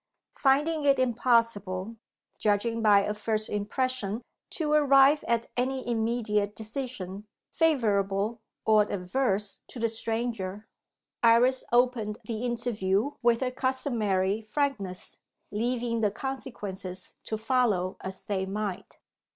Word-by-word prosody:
Finding 300 Hz, +4 st, +2 dB
it 280 Hz, -1 st, +4 dB
impossible, 230 Hz, -5 st, +1 dB, 0.4 s
judging 225 Hz, +2 st, +1 dB
by 205 Hz, -2 st, +6 dB
a 210 Hz, -, -1 dB
first 215 Hz, 0 st, -2 dB
impression, 220 Hz, +1 st, -1 dB, 0.3 s
to 305 Hz, -3 st, -2 dB
arrive 280 Hz, 0 st, +6 dB
at 235 Hz, 0 st, +1 dB
any 260 Hz, +1 st, -1 dB
immediate 220 Hz, -3 st, 0 dB
decision 215 Hz, -4 st, -4 dB, 0.2 s
favourable 215 Hz, -7 st, +1 dB, 0.2 s
or 215 Hz, -1 st, +4 dB
adverse 200 Hz, +1 st, -1 dB
to -, -, -10 dB
the 230 Hz, -, +2 dB
stranger, 225 Hz, -3 st, -3 dB, 0.5 s
Iris 240 Hz, +3 st, +5 dB
opened 240 Hz, -3 st, +2 dB
the 225 Hz, +1 st, -4 dB
interview 235 Hz, -1 st, 0 dB
with 235 Hz, 0 st, +3 dB
her 255 Hz, -1 st, 0 dB
customary 225 Hz, -7 st, 0 dB
frankness; 215 Hz, -6 st, -2 dB, 0.3 s
leaving 230 Hz, +1 st, -1 dB
the 210 Hz, -, +3 dB
consequences 200 Hz, -7 st, -6 dB
to 220 Hz, -, -2 dB
follow 220 Hz, -6 st, +1 dB
as 190 Hz, 0 st, -6 dB
they 190 Hz, -2 st, -2 dB
might. 200 Hz, -1 st, -4 dB
225 Hz, 110 wpm, -28 LUFS, 205-255 Hz, 0.5 s, by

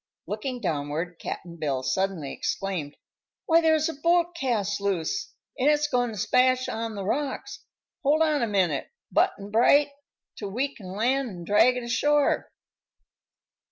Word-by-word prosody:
Looking 230 Hz, +6 st, -4 dB
downward, 160 Hz, 0 st, -3 dB
Cap'n 170 Hz, -1 st, -6 dB
Bill 140 Hz, -5 st, -2 dB
suddenly 160 Hz, +1 st, -1 dB
exclaimed: 180 Hz, -7 st, -3 dB, 0.5 s
"Why, 330 Hz, -1 st, +5 dB
there's 315 Hz, -1 st, +3 dB
a 325 Hz, -, -3 dB
boat 340 Hz, +3 st, +2 dB
cast 210 Hz, -, -1 dB
loose, 200 Hz, -, -1 dB, 0.3 s
an' 270 Hz, +3 st, +4 dB
it's 300 Hz, 0 st, +3 dB
goin' 250 Hz, -4 st, +1 dB
to 215 Hz, -, -7 dB
smash 255 Hz, +5 st, +3 dB
on 225 Hz, 0 st, -4 dB
the 200 Hz, -2 st, -4 dB
rocks. 275 Hz, +6 st, -3 dB, 0.4 s
Hold 305 Hz, +3 st, +3 dB
on 305 Hz, -2 st, +1 dB
a 235 Hz, -, +1 dB
minute, 185 Hz, -8 st, 0 dB, 0.2 s
Butt'n 200 Hz, +1 st, +1 dB
Bright, 280 Hz, +6 st, +5 dB, 0.5 s
till 205 Hz, -, -4 dB
we 265 Hz, +7 st, -2 dB
can 185 Hz, -3 st, -9 dB
land 250 Hz, +5 st, +1 dB
an' 175 Hz, -4 st, -8 dB
drag 225 Hz, +7 st, +4 dB
it 250 Hz, -, -4 dB
ashore." 290 Hz, +5 st, +2 dB
230 Hz, 150 wpm, -26 LUFS, 190-280 Hz, 0.5 s, Why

